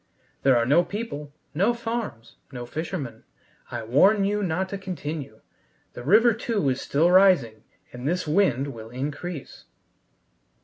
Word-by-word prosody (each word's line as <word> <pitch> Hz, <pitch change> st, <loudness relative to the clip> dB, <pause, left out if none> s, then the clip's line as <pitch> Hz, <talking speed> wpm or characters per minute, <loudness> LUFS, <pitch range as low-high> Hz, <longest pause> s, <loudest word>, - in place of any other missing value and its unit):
There 135 Hz, -2 st, +4 dB
are 115 Hz, -, +2 dB
no 150 Hz, +8 st, +4 dB
people, 175 Hz, -9 st, -6 dB, 0.2 s
no 200 Hz, +10 st, +2 dB
farms, 225 Hz, -, -5 dB
no 125 Hz, -2 st, -6 dB
fishermen. 155 Hz, 0 st, -5 dB, 0.5 s
I -, -, -5 dB
warn 195 Hz, -, +4 dB
you 205 Hz, +1 st, 0 dB
not 185 Hz, 0 st, -1 dB
to 200 Hz, -, -5 dB
continue. 155 Hz, -, -6 dB, 0.5 s
The -, -, -8 dB
river, 225 Hz, -, +5 dB
too, 220 Hz, -, -1 dB
is 130 Hz, 0 st, -1 dB
still 165 Hz, +5 st, +2 dB
rising, 175 Hz, -, +4 dB, 0.3 s
and 125 Hz, +2 st, -5 dB
this 180 Hz, +1 st, -1 dB
wind 145 Hz, -5 st, +1 dB
will 110 Hz, -1 st, -10 dB
increase." 145 Hz, +5 st, -6 dB
160 Hz, 140 wpm, -25 LUFS, 130-195 Hz, 0.5 s, river